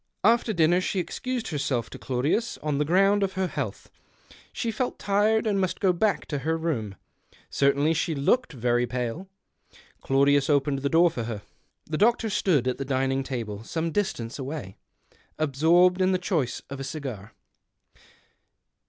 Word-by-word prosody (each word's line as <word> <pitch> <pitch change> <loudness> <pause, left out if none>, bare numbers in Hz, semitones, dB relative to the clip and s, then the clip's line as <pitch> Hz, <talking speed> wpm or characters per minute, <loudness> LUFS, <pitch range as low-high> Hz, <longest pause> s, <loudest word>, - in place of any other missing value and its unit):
After 230 +2 +3
dinner 175 -1 +3
she 190 - -2
excused 250 +6 -3
herself 135 -6 -2
to - - -9
Claudius 140 - -1
on 150 -2 -1
the 150 - +1
ground 195 +5 +3
of 195 -1 0
her 190 0 0
health. - - -5 0.6
She 230 - -2
felt 245 +3 -2
tired, 210 +3 +2
and 200 -3 +1
must 185 - -1
go 190 -2 +3
back 205 +4 0
to 145 - -2
her 160 +4 -1
room; 125 -12 -2 0.6
certainly 140 +3 +2
she 165 0 -1
looked 245 - +1
very 120 -2 0
pale. 125 +9 -4 0.7
Claudius 140 +1 +3
opened 140 -1 +2
the 140 +1 -1
door 170 +2 +4
for 120 -5 -4
her. 110 -3 -5 0.4
The 155 0 -3
doctor 225 0 +3
stood 160 - +2
at 130 - -1
the - - -1
dining 135 0 0
table, 115 -6 -5
some 165 +6 -3
distance 150 - -2
away, 135 -8 -6 0.6
absorbed 165 +5 +3
in 185 0 +3
the - - +3
choice 170 - -2
of 140 - -5
a - - -4
cigar. 130 -8 -6
155 Hz, 160 wpm, -26 LUFS, 135-190 Hz, 0.7 s, door